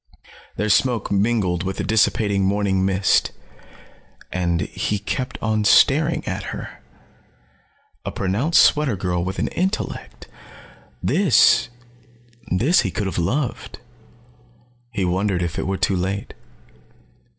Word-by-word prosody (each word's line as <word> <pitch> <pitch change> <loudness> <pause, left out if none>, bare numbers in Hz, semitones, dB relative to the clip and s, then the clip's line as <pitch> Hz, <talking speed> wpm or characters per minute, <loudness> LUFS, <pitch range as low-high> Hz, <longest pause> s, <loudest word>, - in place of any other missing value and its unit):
Their 105 - -2
smoke 120 +2 +1
mingled 100 -4 +1
with 95 +1 -4
the - - -2
dissipating 105 -2 +1
morning 95 -1 +1
mist. 95 0 +2 1.0
And 85 -2 -1
he 105 +6 -2
kept 130 +6 -4
on 110 -1 0
staring 150 +9 +4
at - - -3
her. - - -8 1.2
A - - -4
pronounced 125 - +2
sweater 150 -7 +2
girl 90 -2 -2
with 95 +2 -4
an - - -1
intellect. 190 +4 -4 0.8
This 185 -10 +4 0.8
he 125 - +2
could 105 - -3
have 95 - -2
loved. 125 - -2 1.1
He 100 -5 -1
wondered 90 0 0
if 85 0 -3
it - - -3
were 95 0 -1
too 95 - 0
late. 95 +2 -3
100 Hz, 115 wpm, -21 LUFS, 95-120 Hz, 1.2 s, staring